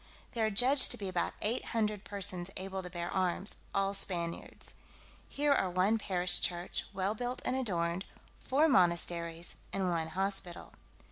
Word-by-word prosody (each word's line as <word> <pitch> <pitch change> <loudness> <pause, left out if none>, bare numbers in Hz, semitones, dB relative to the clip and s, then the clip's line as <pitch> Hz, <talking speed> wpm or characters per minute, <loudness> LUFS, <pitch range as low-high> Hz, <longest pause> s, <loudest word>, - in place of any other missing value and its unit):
There 225 -3 +1
are - - +1
judged 250 +6 +5
to - - +1
be 200 - -4
about 180 -2 -1
eight 225 +4 +1
hundred 210 -3 -1
persons 190 -3 -3
able 190 0 -3
to 180 - -7
bear 175 -1 -4
arms, 185 +1 -1
all 195 0 0
Spaniards. 170 -4 -2 0.6
Here 290 0 +2
are 190 -9 +1
one 190 +5 +2
parish 180 -3 +2
church, 175 0 -1
well 195 +1 -1
built 245 +3 -4
and 255 - 0
adorned, 180 -7 -1 0.3
four 290 +5 +3
monasteries, 170 - +2
and 190 -2 0
one 165 -2 -1
hospital. 190 +1 -3
190 Hz, 155 wpm, -32 LUFS, 175-215 Hz, 0.6 s, judged